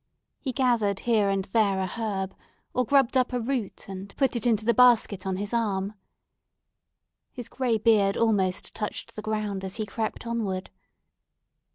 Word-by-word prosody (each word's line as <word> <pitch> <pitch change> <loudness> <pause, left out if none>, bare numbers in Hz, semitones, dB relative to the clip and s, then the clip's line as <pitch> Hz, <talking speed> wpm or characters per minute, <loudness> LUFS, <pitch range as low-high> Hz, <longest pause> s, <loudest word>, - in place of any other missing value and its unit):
He 265 - -3
gathered 235 -6 +1
here 220 -4 +2
and 195 -1 0
there 200 -1 +2
a 190 - 0
herb, 195 -2 -3 0.4
or 250 - +2
grubbed 270 0 +3
up 255 -1 +2
a 250 - +1
root 240 -3 -3
and 195 0 -8
put 270 -3 +2
it 235 0 0
into 220 -2 +2
the 235 - +4
basket 225 -5 +4
on 190 - 0
his 205 +4 -4
arm. 205 -3 0 1.4
His 245 -2 -7
gray 250 -4 0
beard 210 -3 +3
almost 200 -5 +1
touched 210 -1 -5
the 215 - -5
ground 215 -2 -2
as 190 0 -5
he 220 - -2
crept 220 +3 -4
onward. 210 -6 -3
215 Hz, 165 wpm, -26 LUFS, 195-235 Hz, 1.4 s, the